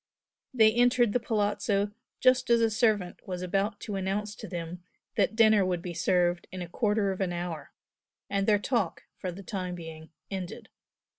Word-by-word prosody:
They 220 Hz, -3 st, +5 dB
entered 240 Hz, -2 st, +4 dB
the 245 Hz, -, +3 dB
Palazzo 205 Hz, -2 st, 0 dB, 0.3 s
just 255 Hz, -1 st, +4 dB
as 235 Hz, 0 st, +5 dB
a 225 Hz, -1 st, +3 dB
servant 215 Hz, -5 st, 0 dB
was 180 Hz, -1 st, -4 dB
about 195 Hz, +3 st, 0 dB
to 205 Hz, -, -4 dB
announce 195 Hz, +2 st, -2 dB
to 215 Hz, -, -8 dB
them 175 Hz, 0 st, -6 dB, 0.3 s
that -, -, +2 dB
dinner 220 Hz, -3 st, +6 dB
would 180 Hz, -2 st, -1 dB
be 175 Hz, -, -4 dB
served 175 Hz, 0 st, +1 dB
in 185 Hz, -1 st, -5 dB
a -, -, -7 dB
quarter 205 Hz, +1 st, +1 dB
of 190 Hz, -, -4 dB
an 185 Hz, -2 st, 0 dB
hour, 175 Hz, -4 st, -5 dB, 0.6 s
and 200 Hz, 0 st, 0 dB
their 210 Hz, -1 st, +5 dB
talk, 205 Hz, -4 st, -1 dB, 0.2 s
for 185 Hz, -, -3 dB
the 195 Hz, +3 st, -9 dB
time 185 Hz, -3 st, -4 dB
being, 160 Hz, -2 st, -9 dB, 0.2 s
ended. 190 Hz, -2 st, -6 dB
195 Hz, 175 wpm, -29 LUFS, 180-215 Hz, 0.6 s, dinner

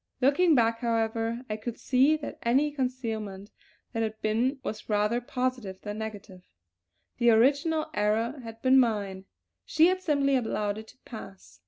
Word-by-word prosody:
Looking 295 Hz, +6 st, +4 dB
back, 230 Hz, -2 st, +2 dB
however, 230 Hz, 0 st, -1 dB
I 215 Hz, -, -3 dB
could 225 Hz, +1 st, -6 dB
see 270 Hz, +4 st, +3 dB
that 300 Hz, -, -8 dB
any 270 Hz, +6 st, +2 dB
concealment 225 Hz, -7 st, -4 dB, 0.4 s
that 225 Hz, -, -1 dB
had 220 Hz, -1 st, -3 dB
been 235 Hz, +6 st, 0 dB
was 215 Hz, +1 st, -6 dB
rather 210 Hz, +3 st, +1 dB
positive 245 Hz, -6 st, -3 dB
than 210 Hz, 0 st, -5 dB
negative. 205 Hz, -4 st, -7 dB, 0.8 s
The 240 Hz, -1 st, +5 dB
original 285 Hz, +7 st, +3 dB
error 225 Hz, +6 st, 0 dB
had 225 Hz, -2 st, -10 dB
been 260 Hz, 0 st, +6 dB
mine; 200 Hz, -6 st, 0 dB, 0.4 s
she 325 Hz, +2 st, +4 dB
had 370 Hz, 0 st, -1 dB
simply 280 Hz, -5 st, +2 dB
allowed 215 Hz, -4 st, -1 dB
it 220 Hz, -, -11 dB
to 250 Hz, -, -17 dB
pass. 195 Hz, -, -11 dB
230 Hz, 155 wpm, -28 LUFS, 215-260 Hz, 0.8 s, been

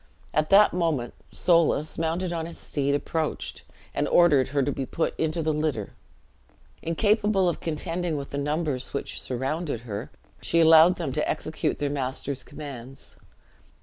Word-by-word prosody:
At 155 Hz, +1 st, +1 dB
that 205 Hz, +2 st, +6 dB
moment 160 Hz, -9 st, 0 dB, 0.2 s
Soulis, 165 Hz, -3 st, +2 dB
mounted 170 Hz, +2 st, -1 dB
on 165 Hz, -1 st, -3 dB
his 170 Hz, -, -9 dB
steed, 140 Hz, -1 st, -1 dB
approached, 155 Hz, +2 st, -3 dB, 0.3 s
and -, -, 0 dB
ordered 150 Hz, -7 st, +5 dB
her 140 Hz, 0 st, 0 dB
to 145 Hz, -, 0 dB
be 135 Hz, -, -3 dB
put 160 Hz, +5 st, -1 dB
into 160 Hz, +1 st, 0 dB
the 155 Hz, 0 st, +1 dB
litter. 150 Hz, -9 st, -2 dB, 0.9 s
Incapable 205 Hz, +3 st, +2 dB
of 175 Hz, -, -1 dB
contending 165 Hz, 0 st, -2 dB
with 140 Hz, -1 st, -6 dB
the 140 Hz, -, -2 dB
numbers 145 Hz, -3 st, -2 dB
which 140 Hz, -, -3 dB
surrounded 135 Hz, +1 st, -3 dB
her, 110 Hz, -1 st, -6 dB, 0.3 s
she 170 Hz, -, +2 dB
allowed 165 Hz, +2 st, +7 dB
them 160 Hz, -7 st, -3 dB
to 150 Hz, -, -1 dB
execute 155 Hz, 0 st, -2 dB
their 145 Hz, -1 st, -1 dB
master's 135 Hz, 0 st, -3 dB
commands. 135 Hz, -3 st, -10 dB
155 Hz, 150 wpm, -26 LUFS, 140-170 Hz, 0.9 s, allowed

